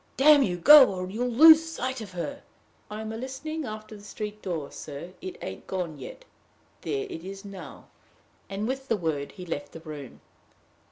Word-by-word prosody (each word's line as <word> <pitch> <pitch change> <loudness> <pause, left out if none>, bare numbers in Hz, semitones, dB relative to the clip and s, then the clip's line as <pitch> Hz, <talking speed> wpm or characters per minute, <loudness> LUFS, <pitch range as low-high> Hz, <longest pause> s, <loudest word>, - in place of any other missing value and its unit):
"Damn 290 +1 +7
you, 180 -8 0
go, 285 - +9
or 185 0 -5
you'll 245 +4 -1
lose 315 +6 +8
sight 260 -6 -4
of 200 -4 -9
her!" 280 +11 -5 0.5
"I'm 215 +1 -5
a - - -5
listenin' 275 +5 -5
after 215 -1 -8
the 205 - -13
street 210 0 -6
door, 165 -7 -4
sir. 150 +5 -8
It 185 - -7
ain't 95 - -7
gone 175 -6 -4
yet. - - -10 0.6
There 415 0 -2
it 165 - -8
is 195 +2 -8
now!" 190 -7 -10 0.6
And 200 +2 -3
with 265 +1 -4
the 225 - +1
word 155 -5 -3
he 180 - -9
left 145 -4 -5
the - - -8
room. 150 -5 -9
210 Hz, 180 wpm, -27 LUFS, 175-265 Hz, 0.6 s, go